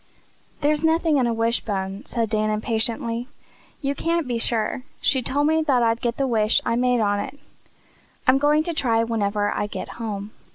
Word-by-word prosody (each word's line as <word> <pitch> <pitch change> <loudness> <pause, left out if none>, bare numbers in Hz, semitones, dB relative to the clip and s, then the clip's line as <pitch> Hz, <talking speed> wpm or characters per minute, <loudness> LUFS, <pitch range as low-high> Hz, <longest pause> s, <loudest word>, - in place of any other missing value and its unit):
"There's 300 +1 +1
nothing 320 -1 +3
in 250 -3 +2
a - - +1
wishbone," 215 -2 -1
said 230 -2 -1
Dan 215 0 0
impatiently. 230 +2 -1 0.6
"You 275 0 +1
can't 330 +1 -1
be 240 -2 -1
sure. 230 +2 0 0.2
She 270 -2 +2
TOLD 285 +4 0
me 315 +1 +3
I'd 235 -3 +3
get 235 -1 -1
the 275 - +1
wish 220 -3 +2
I 230 - +1
made 250 -1 +2
on 205 -1 +1
it. 260 - -5 0.9
I'm 265 0 +5
going 300 +2 +3
to 340 - -3
try 230 -7 +2
whenever 205 -2 0
I 205 - -1
get - - -6
home." 205 -2 -4
235 Hz, 175 wpm, -23 LUFS, 215-280 Hz, 0.9 s, I'm